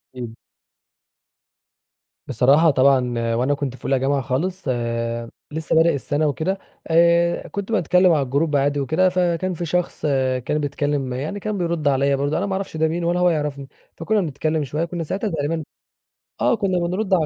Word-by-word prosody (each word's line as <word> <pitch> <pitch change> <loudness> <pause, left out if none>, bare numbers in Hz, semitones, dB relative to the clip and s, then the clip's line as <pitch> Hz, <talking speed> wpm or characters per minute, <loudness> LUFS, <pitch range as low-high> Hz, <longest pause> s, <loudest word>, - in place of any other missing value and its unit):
إمم. 120 -3 -7 1.9
بصراحة، 140 +7 +4
طبعًا 125 -4 +2
وأنا 130 +5 +1
كنت 140 -3 -3
في - - -15
أولى 135 -1 +2
جامعة 135 +1 +1
خالص 175 +9 -2
آآ، 115 -1 -2 0.2
لسّه 160 +1 -2
بادئ 165 0 +4
السنة 145 +2 0
وكده، 160 +7 -1 0.3
آآ 170 +1 +3
كنت 200 +6 -5
باتكلّم 180 -2 +4
على 155 -3 +3
الجروب 145 +4 0
عادي 145 +1 +1
وكده 160 +7 +2
فكان 180 0 0
في 175 0 -4
شخص 175 +2 -2 0.4
كان 150 - 0
بيتكلّم 145 -2 -2
يعني، 150 +11 -4
كان 210 +1 -3
بيرد 170 -4 -1
عليَّ 140 0 +2
برضه 140 +2 -1
أنا - - 0
ما 195 - -2
أعرفش 190 -4 -4
ده 160 0 +2
مين 170 +2 -2
ولا 175 +1 +1
هو 180 0 +4
يعرفني. 150 -4 -2 0.3
فكنا 205 +6 +1
بنتكلّم 155 -1 -1
شويّة 150 +4 -2
كنّا 170 0 -4
ساعتها 195 +7 -2
تقريبًا 160 0 -2 0.8
آه، - - +3
كنّا 195 -4 0
بنرد 185 +4 -1
على 170 -4 +3
155 Hz, 170 wpm, -21 LUFS, 140-175 Hz, 1.9 s, بصراحة